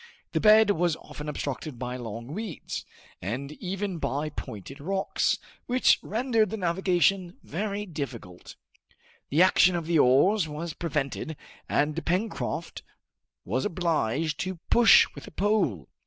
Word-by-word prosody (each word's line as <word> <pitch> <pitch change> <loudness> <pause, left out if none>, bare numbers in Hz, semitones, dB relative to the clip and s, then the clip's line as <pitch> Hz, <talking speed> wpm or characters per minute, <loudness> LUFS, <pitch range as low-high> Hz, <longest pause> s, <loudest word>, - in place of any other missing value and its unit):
The - - 0
bed 215 -1 +6
was 175 -3 +1
often 150 -1 -8
obstructed 140 -1 -4
by 125 +1 -4
long 115 -2 -6
weeds, 195 +1 -5 0.4
and 125 - -4
even 190 +2 -4
by 140 +2 -2
pointed 110 0 -8
rocks, 190 +6 0 0.3
which 255 +1 +4
rendered 225 -1 +1
the 220 - -4
navigation 180 0 +1
very 205 +4 -3
difficult. 130 - -7 0.7
The 155 +6 +5
action 185 -1 +5
of 170 -2 -2
the 165 -1 +2
oars 160 +9 +4
was 155 +2 -5
prevented, 150 -1 -3 0.3
and 155 +2 +1
Pencroft 185 +7 -2 0.6
was 125 +8 -1
obliged 160 -4 0
to 185 -1 -3
push 235 -3 +8
with - - -10
a - - -10
pole. 185 - 0
165 Hz, 130 wpm, -27 LUFS, 140-195 Hz, 0.7 s, push